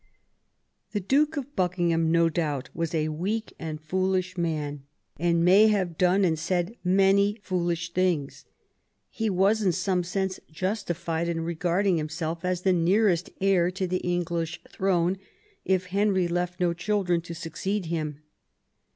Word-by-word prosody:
The 205 - 0
Duke 290 - +2
of 285 +1 -5
Buckingham, 175 -3 +1
no 170 0 +4
doubt, 150 -6 -2
was 165 0 -2
a 155 -1 0
weak 200 +8 -3
and 155 -2 -5
foolish 185 +3 -1
man, 155 -4 -2 0.4
and 170 0 +2
may 200 +4 +7
have 190 -6 +1
done 185 +3 +3
and 160 -3 +1
said 175 +5 -1
many 195 +2 +4
foolish 175 -2 -2
things. 175 -7 0 0.7
He 225 -2 -1
was 200 +3 +3
in 190 -3 +3
some 180 +1 0
sense 190 +1 -2
justified 170 -2 -2
in 165 -1 -1
regarding 175 +3 +1
himself 160 +2 -3
as 180 -1 -1
the 190 - +4
nearest 180 +1 +2
heir 185 -3 +3
to 185 +1 -2
the 185 0 0
English 170 -2 -2
throne 185 -1 0 0.5
if 185 -1 +1
Henry 190 -1 +1
left 175 +1 -2
no 175 -1 +2
children 180 -1 0
to 170 0 -8
succeed 190 +5 -3
him. 155 -3 -3
180 Hz, 145 wpm, -26 LUFS, 165-190 Hz, 0.7 s, may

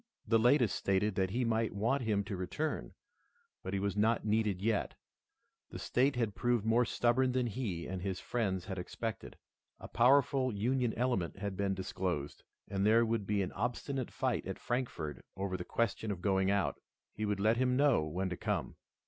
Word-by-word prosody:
The 115 +1 +4
latest 120 -2 +4
stated 100 +2 +1
that 95 -1 0
he 120 +5 0
might 115 -2 0
want 120 +7 +1
him 105 -4 +1
to 100 0 -5
return, 95 +13 -3 0.7
but - - -5
he 100 - 0
was 100 +1 -1
not 110 +2 +2
needed 105 -3 +1
yet. 110 +1 0 0.7
The - - -7
state 135 +2 +1
had 115 -4 0
proved 120 -1 0
more 115 +2 +4
stubborn 125 +3 +2
than 125 -1 +1
he 105 -8 -3
and 95 0 -4
his 95 -1 -3
friends 95 -7 -1
had 95 -1 -4
expected. 110 +5 -5 0.4
A - - -8
powerful 130 +1 +4
Union 120 +3 +1
element 120 -9 0
had 100 -1 -4
been 100 0 0
disclosed, 90 -6 -3 0.3
and 100 0 -1
there 115 +3 +5
would 110 -3 -1
be 100 -1 +1
an 90 - -4
obstinate 125 +4 -2
fight - - -1
at - - -4
Frankfort 120 - -3
over 95 -1 -2
the 90 - -4
question 110 -1 -1
of 100 -3 -2
going 95 -1 +2
out. 100 -1 +1 0.3
He 110 - -5
would 105 -1 -1
let 110 +3 +3
him 125 0 +2
know 140 - +4
when 90 +5 -2
to - - -1
come. - - -2
110 Hz, 185 wpm, -33 LUFS, 95-120 Hz, 0.7 s, there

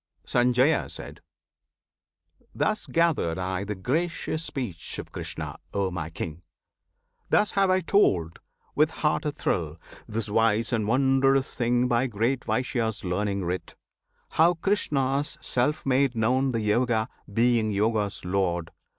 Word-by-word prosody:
Sanjaya. 125 +5 +1 1.4
Thus 215 0 0
gathered 160 - +1
I 95 +1 -2
the 105 +1 -4
gracious 155 - -2
speech 125 - -5
of - - -7
Krishna, - - -5 0.2
O 100 -2 0
my 80 -3 -4
King! 80 0 -6 0.9
Thus 210 0 +3
have 195 -1 +2
I 185 0 +3
told, 90 - +2 0.3
with 150 +1 +3
heart 155 -1 -1
a 150 - +1
thrill, 85 - -2 0.3
this 110 0 -3
wise 115 +2 +2
and 110 -3 0
wondrous 135 +2 +3
thing 120 0 +1
By 120 +1 +2
great 120 +4 -1
Vyasa's 115 -1 -1
learning 100 +1 -1
writ, 90 +2 -4 0.5
how 170 +2 +4
Krishna's 145 -6 0
self 145 +2 0
made 135 -1 +2
known 130 +4 +2
The 115 -2 -1
Yoga, 110 +1 +1 0.2
being 115 0 +2
Yoga's 105 -1 0
Lord. 90 -3 -1
120 Hz, 125 wpm, -26 LUFS, 100-135 Hz, 1.4 s, how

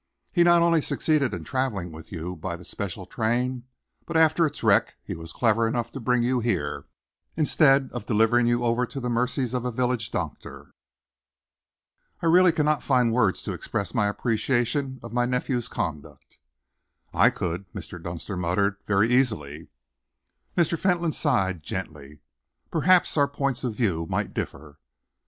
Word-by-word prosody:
He 175 - +4
not 170 0 +5
only 170 -2 +3
succeeded 145 -3 +1
in 90 -5 -5
travelling 105 -7 -2
with 80 0 -12
you 90 +1 -5
by 85 +2 -5
the 90 - -13
special 95 0 -5
train, 120 +3 -1 0.4
but 165 - 0
after 160 +1 +4
its 150 -3 -8
wreck 105 -3 +3
he - - -5
was 80 0 -8
clever 115 +1 +2
enough 115 0 -2
to 135 - -7
bring 125 0 +1
you 125 +1 +1
here, 90 -12 -2 0.5
instead 140 -3 +4
of 120 -4 -6
delivering 115 +2 +3
you 120 0 +1
over 120 +1 +1
to 135 - -6
the 125 -1 -3
mercies 125 +1 0
of 125 -1 -1
a 125 - -1
village 120 -2 -1
doctor. - - -6 1.5
I - - -5
really 175 +2 +6
cannot 150 -2 +1
find 125 -4 +2
words 110 -6 +1
to - - -3
express 100 - -4
my 110 -5 +2
appreciation 125 +5 -1
of 115 -1 -9
my 120 0 +1
nephew's 125 -1 -1
conduct." 75 -2 -6 0.7
"I - - +5
could," 90 +2 -4
Mr. 90 - -8
Dunster 85 +3 -5
muttered, 95 +3 0
"very 100 +2 +3
easily!" 110 - 0 0.9
Mr. 170 -1 +2
Fentolin 175 -3 +1
sighed 95 - 0
gently. 75 -4 -7 0.5
"Perhaps 180 +1 +3
our 140 -1 +4
points 140 -2 -2
of 120 -4 -2
view 85 -8 0
might - - -2
differ." 75 -2 -6
120 Hz, 160 wpm, -25 LUFS, 95-135 Hz, 1.5 s, really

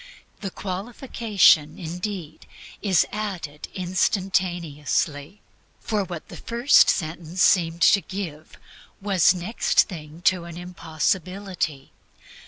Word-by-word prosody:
The 200 - -4
qualification, 195 - +1
indeed, 175 -1 -6 0.3
is 190 -5 +3
added 185 -9 -5
instantaneously. 175 -3 -1 0.4
For 210 -2 -1
what 175 -3 -7
the - - -10
first 235 +4 +4
sentence 170 +1 -1
seemed 170 -2 +3
to 200 - +6
give 170 -7 -7 0.4
was 195 -2 +3
next 180 +6 +2
thing 160 -3 -10
to 185 -2 +2
an 170 -1 -9
impossibility. 180 -2 -3
180 Hz, 95 wpm, -24 LUFS, 160-195 Hz, 0.4 s, to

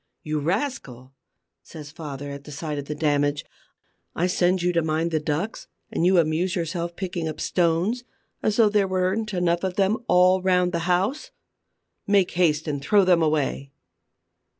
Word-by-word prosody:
"You 155 0 -2
rascal!" 145 - -3 0.5
says 150 -3 -11
father, 145 -3 -7
at 140 +1 -9
sight 150 0 -4
of 140 - -6
the 150 - -5
damage. 145 -1 0 0.7
"I 170 - +1
send 180 0 +1
you 180 0 +1
to 170 - +2
mind 160 +1 -1
the 160 - +1
ducks 155 +8 -3 0.2
and - - -1
you 185 0 +4
amuse 170 +3 +1
yourself 170 0 -3
picking 175 -4 -4
up 155 0 -5
stones, 180 +8 0 0.4
as 215 - 0
though 220 -2 +5
there 205 -2 +2
weren't 190 +4 -1
enough 175 -2 0
of 185 -1 -2
them 200 +2 +2
all 180 +1 +4
round 180 -1 +2
the 170 0 -2
house! 200 +12 0 0.8
Make 200 -3 +3
haste 160 -4 +1
and 145 -2 -2
throw 200 +7 +3
them 180 -2 +4
away!" 150 -3 0
170 Hz, 165 wpm, -24 LUFS, 155-185 Hz, 0.8 s, though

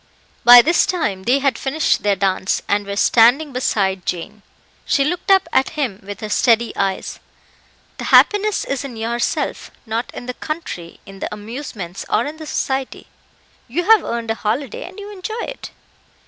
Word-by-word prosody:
By 240 0 +10
this 345 +4 +3
time 210 - -1
they 250 +3 +3
had 275 -4 0
finished 290 +3 0
their 205 -1 +2
dance, 190 -1 0
and 205 0 0
were 200 - -3
standing 245 +8 +4
beside 195 -7 0
Jane. 205 +5 -5 0.4
She 285 -4 +2
looked 355 +5 -3
up 385 -2 +5
at 270 +4 +1
him 245 -10 -2
with 200 0 -9
her 215 - -5
steady 235 +1 +2
eyes 195 -1 -2 0.8
"The - - -4
happiness 415 0 +4
is 275 -1 -3
in 255 -5 -8
yourself 235 +2 -2 0.2
not 230 +1 -3
in - - -7
the 250 - -4
country, 250 - -6
in 195 0 -12
the - - -4
amusements, 210 -4 -7
or 230 - +1
in 300 +2 -6
the 310 -1 -9
society. 265 -2 -3 0.6
You 305 +9 -2
have 440 -4 +6
earned 235 -1 -3
a 225 - -5
holiday, 230 +4 -2
and 375 +3 -12
you 410 0 -8
enjoy 435 +4 -5
it." - - -7
240 Hz, 175 wpm, -19 LUFS, 205-300 Hz, 0.8 s, By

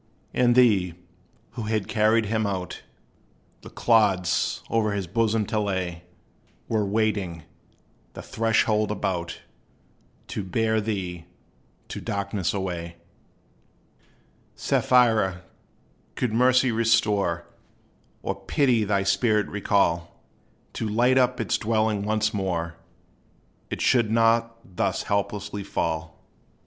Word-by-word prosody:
And 120 -1 +3
they, 100 -9 +4 0.6
who 120 - -6
had 110 -2 -1
carried 110 0 +2
him 110 0 0
out, 95 -2 -4 0.8
The - - -11
clods 105 -6 +2
o'er 110 -2 +1
his 100 -2 -2
bosom 110 +3 +1
to 110 - -1
lay, 90 -4 -3 0.6
Were 110 -2 +1
waiting, 100 -5 -1 0.7
the - - -9
threshold 110 -1 +1
about, 90 -4 -3 0.9
To 105 - -3
bear 110 +3 0
thee 90 -5 -4 0.6
to - - -6
darkness 100 -2 -2
away. 85 -4 -4 1.6
Sapphira, 110 -7 +2 0.7
could 125 -4 -1
Mercy 125 +1 +4
restore, 105 -6 +1 0.8
Or - - -1
Pity 125 -6 +1
thy 100 -1 +1
spirit 105 +1 +2
recall, 85 -5 0 0.5
To 110 - -3
light 125 +4 +3
up 125 0 +2
its 115 - 0
dwelling 110 -1 +1
once 110 0 0
more, 90 -4 -2 1.0
It - - -4
should 120 -4 +3
not 115 +1 +2 0.2
thus - - 0
hopelessly 100 0 -2
fall. 80 -4 -3
105 Hz, 105 wpm, -25 LUFS, 95-115 Hz, 1.6 s, they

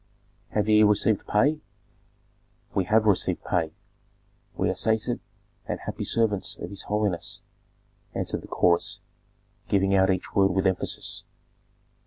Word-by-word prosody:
"Have 105 0 0
ye 110 0 +5
received 105 0 +3
pay?" 145 +9 +2 1.1
"We 95 - +1
have 110 +3 +3
received 100 -4 +2
pay; 80 -3 0 0.9
we - - +1
are - - -4
sated 110 +2 +1 0.5
and - - -3
happy - - -5
servants 110 -4 +1
of 85 - -7
his 100 - -3
holiness," 105 -4 -1 0.7
answered - - -2
the - - -12
chorus, 85 -1 +2 0.7
giving 95 0 +2
out 95 0 +4
each 95 -1 -1
word 95 -2 +3
with 95 - +1
emphasis. 95 -1 -1
100 Hz, 130 wpm, -26 LUFS, 95-110 Hz, 1.1 s, ye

